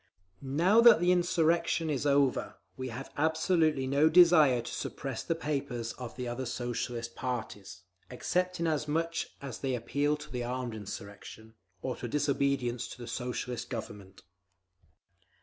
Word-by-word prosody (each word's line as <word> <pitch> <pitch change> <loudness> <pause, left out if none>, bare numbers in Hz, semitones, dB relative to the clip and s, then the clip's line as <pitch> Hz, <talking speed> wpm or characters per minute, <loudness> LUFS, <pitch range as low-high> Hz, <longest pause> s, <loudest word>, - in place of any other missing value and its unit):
"Now 170 +11 +3
that 235 -7 +8
the 175 +1 +3
insurrection 170 -2 +2
is 145 0 -1
over, 140 -2 +2 0.2
we 130 0 -5
have 125 +3 -7
absolutely 160 -2 +2
no 140 +4 +3
desire 160 -8 +6
to - - -7
suppress 135 -2 -4
the 165 - -1
papers 140 -7 -3
of 125 -3 -8
the 125 -1 -4
other 120 +2 -4
Socialist 120 -1 -3
parties, 105 -6 -5 0.3
except 180 +8 -1
inasmuch 160 0 0 0.3
as 135 -4 -6
they 130 -2 -1
appeal 145 +5 0
to 125 -4 -6
armed 125 0 -3
insurrection, 105 +1 -9 0.3
or 130 - -2
to 120 - -5
disobedience 135 -3 0
to - - -10
the 120 - -8
Soviet 125 +1 -4
Government. 105 -5 -8
135 Hz, 135 wpm, -30 LUFS, 120-160 Hz, 0.3 s, that